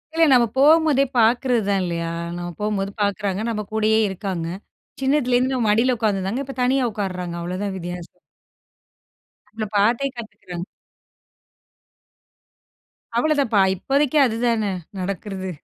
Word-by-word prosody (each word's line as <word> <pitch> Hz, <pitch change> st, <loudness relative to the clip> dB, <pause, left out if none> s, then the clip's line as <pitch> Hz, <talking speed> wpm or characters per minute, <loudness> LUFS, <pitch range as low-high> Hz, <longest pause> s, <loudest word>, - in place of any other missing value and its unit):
இல்ல 330 Hz, 0 st, +5 dB
நம்ம 245 Hz, -2 st, +6 dB
போம்போதே 300 Hz, 0 st, +5 dB
பார்க்குறது 240 Hz, +1 st, +3 dB
தான் 195 Hz, -1 st, +2 dB
இல்லையா, 170 Hz, -1 st, -3 dB, 0.3 s
நம்ம 175 Hz, 0 st, -5 dB
போம்போது 200 Hz, -2 st, -1 dB
பார்க்குறாங்க, 200 Hz, -1 st, -1 dB
நம்ப 215 Hz, -2 st, -2 dB
கூடயே 220 Hz, 0 st, +3 dB
இருக்காங்க 190 Hz, -3 st, -4 dB, 0.5 s
சின்னதுலேருந்து 260 Hz, -2 st, +2 dB
மடியில 235 Hz, +4 st, +3 dB
உட்காந்துருந்தாங்க, 210 Hz, +3 st, -1 dB
இப்போ 270 Hz, -, -8 dB
தனியா 260 Hz, +1 st, +2 dB
உட்காருறாங்க, 180 Hz, -4 st, -4 dB
அவ்வளோதான் 185 Hz, +3 st, -3 dB
வித்தியாசம். 175 Hz, -1 st, -8 dB, 1.4 s
நம்ம 215 Hz, -, -1 dB
பார்த்தே 230 Hz, +7 st, +3 dB
கத்துக்கிறாங்க. 180 Hz, -6 st, -7 dB, 2.5 s
அவ்வளோதான்ப்பா, 270 Hz, -4 st, +2 dB, 0.2 s
இப்போதைக்கு 275 Hz, -, +1 dB
அதுதானே, 230 Hz, -3 st, 0 dB, 0.3 s
நடக்கிறது. 190 Hz, 0 st, -4 dB
215 Hz, 105 wpm, -22 LUFS, 190-255 Hz, 2.5 s, நம்ம